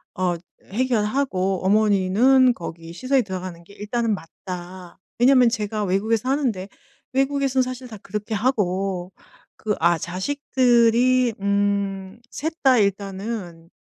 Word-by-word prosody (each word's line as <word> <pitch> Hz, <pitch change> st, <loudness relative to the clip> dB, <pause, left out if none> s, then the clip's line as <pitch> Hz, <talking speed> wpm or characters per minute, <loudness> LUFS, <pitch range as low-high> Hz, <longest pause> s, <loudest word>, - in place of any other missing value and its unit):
어 180 Hz, -1 st, 0 dB, 0.3 s
해결하고 210 Hz, -4 st, -1 dB
어머니는 215 Hz, +6 st, +4 dB
거기 165 Hz, -2 st, -8 dB
시설에 260 Hz, +7 st, +1 dB
들어가는 185 Hz, -3 st, -6 dB
게 185 Hz, -, -17 dB
일단은 225 Hz, +2 st, -1 dB
맞다. 180 Hz, +1 st, -9 dB, 0.2 s
왜냐면 250 Hz, -1 st, +6 dB
제가 215 Hz, -2 st, -2 dB
외국에서 210 Hz, +4 st, 0 dB
사는데 240 Hz, -9 st, -1 dB, 0.4 s
외국에선 270 Hz, 0 st, +1 dB
사실 255 Hz, 0 st, -6 dB
다 220 Hz, -3 st, -9 dB
그렇게 210 Hz, +2 st, -4 dB
하고 195 Hz, -5 st, -1 dB, 0.5 s
그 210 Hz, -1 st, -2 dB
아 170 Hz, +1 st, +3 dB
자식들이 245 Hz, -, +2 dB
음 200 Hz, 0 st, -1 dB
셋 320 Hz, +2 st, -3 dB
다 260 Hz, -2 st, +6 dB
일단은 195 Hz, -3 st, -3 dB
210 Hz, 260 characters per minute, -23 LUFS, 185-250 Hz, 0.5 s, 왜냐면